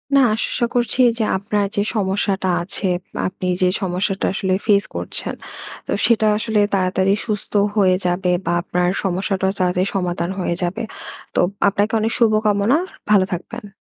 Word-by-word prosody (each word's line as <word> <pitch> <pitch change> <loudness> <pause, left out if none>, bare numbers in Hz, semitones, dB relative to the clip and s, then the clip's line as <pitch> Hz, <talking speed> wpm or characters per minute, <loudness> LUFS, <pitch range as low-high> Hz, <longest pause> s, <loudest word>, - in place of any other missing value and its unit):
না - - +7 0.2
আশা 235 +2 -1
করছি 245 +1 +1 0.2
যে - - +2
আপনার 205 +1 -1
যে 205 - +2
সমস্যাটা 195 -1 0
আছে 190 +2 -2 0.3
বা - - -6
আপনি 185 0 -7 0.2
যে 185 - +4
সমস্যাটা 190 +1 -1
আসলে 190 -1 0
ফেইস 205 -2 +4
করছেন, - - -4 0.5
তো - - -3
সেটা 225 -2 +3
আসলে 220 0 0
তাড়াতাড়ি 190 0 +2
সুস্থ 210 -2 -3 0.2
হয়ে 190 -3 +4
যাবে 180 +1 +1
বা 170 - 0
আপনার 180 0 0 0.2
সমস্যাটাও 190 0 0
তাড়াতাড়ি 180 +1 +1
সমাধান 175 -2 -1
হয়ে 175 -2 -1
যাবে। 175 +1 -2 0.5
তো - - +2 0.3
আপনাকে 205 +2 +1
অনেক 220 +1 0
শুভকামনা, 215 +1 +3 0.3
ভালো 200 -3 +5
থাকবেন। 210 +5 -6
195 Hz, 150 wpm, -20 LUFS, 185-215 Hz, 0.5 s, না